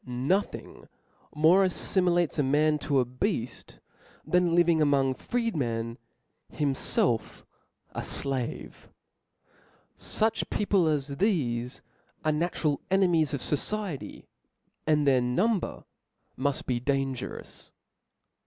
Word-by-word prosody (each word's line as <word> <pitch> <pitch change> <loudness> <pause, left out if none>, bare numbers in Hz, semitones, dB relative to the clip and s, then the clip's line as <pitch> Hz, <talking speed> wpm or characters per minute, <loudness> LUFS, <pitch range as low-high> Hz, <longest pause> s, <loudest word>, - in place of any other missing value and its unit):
Nothing 135 +11 -2 0.5
more 165 +6 +5
aifimilates 175 -3 +1
a - - +5
man 150 +2 +2
to 140 -1 +1
a 125 - +2
bead 125 - -4 0.5
than 180 -1 +2
living 170 -2 +4
among 140 -3 +3
freemen, 125 - -2 0.5
himfelf 135 -5 0 0.5
a - - -4
flave. 135 -3 -4 1.1
Such 220 +1 -1
people 200 -4 +2
as 140 -2 -1
thefe 125 - 0 0.4
are 155 - +3
natural 155 -2 -1
enemies 175 -6 +3
of 130 - -5
the - - +2
fociety; 200 -2 -4 0.6
and 150 -1 +3
their 130 -2 +4
num 185 - +2
ber - - -7 0.5
muft 140 +1 -1
be 125 -2 0
dangerous. 135 0 -3
150 Hz, 105 wpm, -28 LUFS, 130-175 Hz, 1.1 s, more